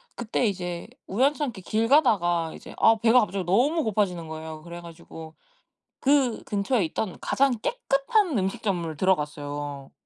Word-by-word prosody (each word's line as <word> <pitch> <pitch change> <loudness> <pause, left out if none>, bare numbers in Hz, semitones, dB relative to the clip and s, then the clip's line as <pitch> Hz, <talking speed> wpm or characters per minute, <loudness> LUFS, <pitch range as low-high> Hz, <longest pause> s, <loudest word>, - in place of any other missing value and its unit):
그때 240 +1 -1
이제 180 -4 -3 0.2
우연찮게 260 0 0
길 220 +5 0
가다가 175 - +3
이제 - - -11
아 225 - +5
배가 235 +2 +6
갑자기 200 -2 -2
너무 270 - +2
고파지는 190 -6 -1
거예요. 160 0 -7
그래 170 +1 -9
가지고 165 -1 -11 0.7
그 270 -4 +2
근처에 205 +1 0
있던 185 +4 -4
가장 275 0 +2
깨끗한 480 - +1
음식점을 185 -4 -2
들어갔어요. 145 -5 -2
195 Hz, 320 characters per minute, -25 LUFS, 170-250 Hz, 0.7 s, 배가